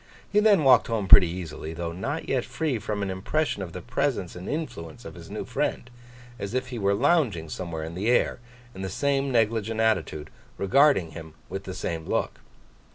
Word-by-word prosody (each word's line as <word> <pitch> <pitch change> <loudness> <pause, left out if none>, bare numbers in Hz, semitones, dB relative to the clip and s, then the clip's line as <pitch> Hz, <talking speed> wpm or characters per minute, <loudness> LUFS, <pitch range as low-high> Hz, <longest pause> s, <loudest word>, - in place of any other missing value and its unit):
He 210 - +3
then 210 -6 +5
walked 135 - +6
home 110 -4 -1
pretty 95 -1 +9
easily, 80 -2 -6
though 85 0 -3
not 135 - -4
yet 130 -3 +1
free 150 -8 -2
from 105 0 -3
an 95 - -2
impression 105 +6 -1
of 90 -3 -5
the 90 - -8
presence 120 -6 -1
and 90 +1 -7
influence 115 - -5
of - - -8
his - - -12
new - - -5
friend—as 120 -2 -5
if 130 0 -1
he 120 -2 -5
were 100 0 +2
lounging 120 - +2
somewhere 85 -2 -5
in 80 +1 -6
the 100 +6 -1
air, 125 - +2 0.3
in 95 - -8
the 95 - -3
same 140 +6 0
negligent 110 -1 +1
attitude, 95 -9 0 0.3
regarding 100 - +4
him 80 -1 -10
with 95 +1 -5
the 95 - -6
same 80 -3 -4
look. - - -1
105 Hz, 190 wpm, -26 LUFS, 90-130 Hz, 0.3 s, pretty